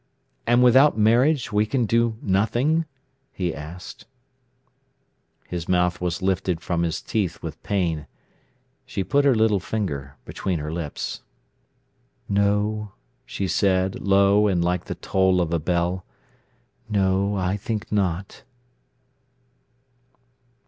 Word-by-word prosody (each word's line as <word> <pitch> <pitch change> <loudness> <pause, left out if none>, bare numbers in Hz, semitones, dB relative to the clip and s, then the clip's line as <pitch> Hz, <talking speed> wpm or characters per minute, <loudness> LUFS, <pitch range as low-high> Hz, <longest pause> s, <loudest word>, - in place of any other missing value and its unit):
"And 120 +1 +4
without 130 +2 +6
marriage 120 +6 +3
we 105 +1 +2
can 125 0 0
do 115 0 +1
nothing?" 120 - +1 0.5
he 90 -3 -2
asked. 80 +5 -9 1.4
His 85 -2 -5
mouth 90 -1 +1
was 90 +1 -2
lifted 95 -2 0
from 85 -1 -2
his 85 -2 -2
teeth 100 -6 -2
with - - -7
pain. 85 -8 -1 0.8
She 95 - -2
put 145 +7 +2
her 135 -3 +5
little 110 -2 +3
finger 75 -10 -4
between 95 -3 -3
her 75 +1 -4
lips. 80 -4 -4 1.1
"No," 105 +1 0 0.3
she 100 -7 -3
said, 95 +1 +1
low 100 +1 +4
and 90 -4 +1
like 90 0 -1
the - - -5
toll 95 -1 +1
of 85 -1 0
a 85 - +2
bell. 85 +3 -1 0.9
"No, 100 0 +1
I 95 0 0
think 105 +1 -4
not." 95 -2 -1
95 Hz, 120 wpm, -23 LUFS, 90-110 Hz, 1.4 s, without